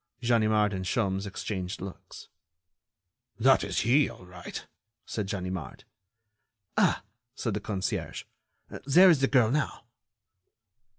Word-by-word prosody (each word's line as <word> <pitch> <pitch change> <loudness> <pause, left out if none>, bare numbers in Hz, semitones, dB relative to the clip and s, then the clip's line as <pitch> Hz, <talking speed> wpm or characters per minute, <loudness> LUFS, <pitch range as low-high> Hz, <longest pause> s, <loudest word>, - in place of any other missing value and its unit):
Ganimard 110 -3 +3
and 95 -1 -3
Sholmes 95 0 -1
exchanged 95 -2 -4
looks. 95 0 -9 1.1
"That - - +5
is - - -1
he, 130 +6 +4
all 90 - -12
right," 90 -1 -8 0.4
said 105 -3 -3
Ganimard. 90 -7 -5 0.9
"Ah!" - - +3 0.3
said 115 - -2
the 105 - -1
concierge, 100 -2 -3 0.6
"there 180 +6 +8
is 150 -5 +2
the 135 - +4
girl 125 -5 +4
now." 150 +1 -1
105 Hz, 115 wpm, -28 LUFS, 95-120 Hz, 1.1 s, there